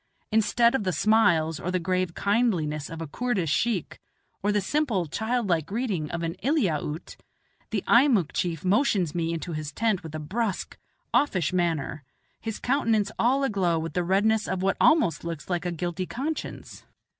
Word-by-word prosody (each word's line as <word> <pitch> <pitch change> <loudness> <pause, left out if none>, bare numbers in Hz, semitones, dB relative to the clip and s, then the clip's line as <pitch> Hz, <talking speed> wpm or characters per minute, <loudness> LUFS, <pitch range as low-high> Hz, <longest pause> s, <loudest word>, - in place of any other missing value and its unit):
Instead 235 +2 +3
of 265 - 0
the 185 - 0
smiles 170 -7 +3
or 180 - -3
the 185 - +1
grave 185 0 -1
kindliness 185 -9 0
of 165 0 -6
a - - -6
Koordish 195 - -1
sheikh, 220 -3 0 0.4
or 205 - +1
the 205 - +2
simple, 220 - 0
childlike 200 -3 -1
greeting 200 -8 -2
of 170 0 -3
an 165 0 -2
Eliaute, 175 - -1 0.5
the 205 -4 -2
Eimuck 235 - +4
chief 170 -2 -2
motions 195 - +2
me 165 -1 -1
into 165 +1 -4
his 155 -1 -4
tent 210 +1 0
in 160 - -7
a - - -3
brusque, 200 +6 -3 0.4
offish 185 - +2
manner, 160 -5 -1 0.4
his 225 -1 -4
countenance 225 -6 +1
all 265 +4 +3
aglow 190 -9 +1
with 160 +1 -4
the 180 - 0
redness 205 +4 +2
of 185 0 -2
what 195 0 +2
almost 305 - +4
looks 170 +1 -5
like 175 0 -1
a - - -1
guilty 175 +2 -3
conscience. 300 +6 -5
185 Hz, 165 wpm, -26 LUFS, 165-225 Hz, 0.5 s, Eimuck